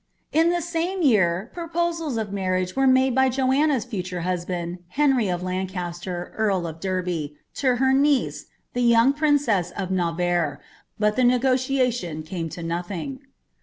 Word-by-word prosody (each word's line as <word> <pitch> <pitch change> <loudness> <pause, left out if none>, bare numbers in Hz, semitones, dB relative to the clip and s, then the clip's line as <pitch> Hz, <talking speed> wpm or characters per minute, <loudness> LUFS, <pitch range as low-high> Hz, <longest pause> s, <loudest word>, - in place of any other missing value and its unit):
* - - -46
In 330 - +4
the 345 -1 -1
name 350 +3 -1
year 195 - +2
proposals 335 -4 -2
of 210 -3 -3
marriage 185 -2 -1
were 270 0 +3
made 260 0 +4
by 265 +1 +4
Joanna's 265 +1 +2
(utun 180 -7 -4
husband, 175 -1 -3
Henry 265 -3 +2
of 180 0 -2
Lancaster, 180 -1 -4
earl 200 -5 +1
of 165 -1 -6
Derby, 180 -5 -3 0.2
to 255 -3 +1
her 265 +1 +2
uie^re, 280 0 +2 0.3
the 240 -1 +3
yonof 245 +5 +4
princess 285 - +2
of 190 -2 -3
Navarre, 175 -3 0 0.4
but 210 0 +1
the 255 - +1
n^oliation 250 - +1
came 165 -1 -4
to 170 - -7
nothing. 175 +10 -4
210 Hz, 150 wpm, -24 LUFS, 180-265 Hz, 0.4 s, In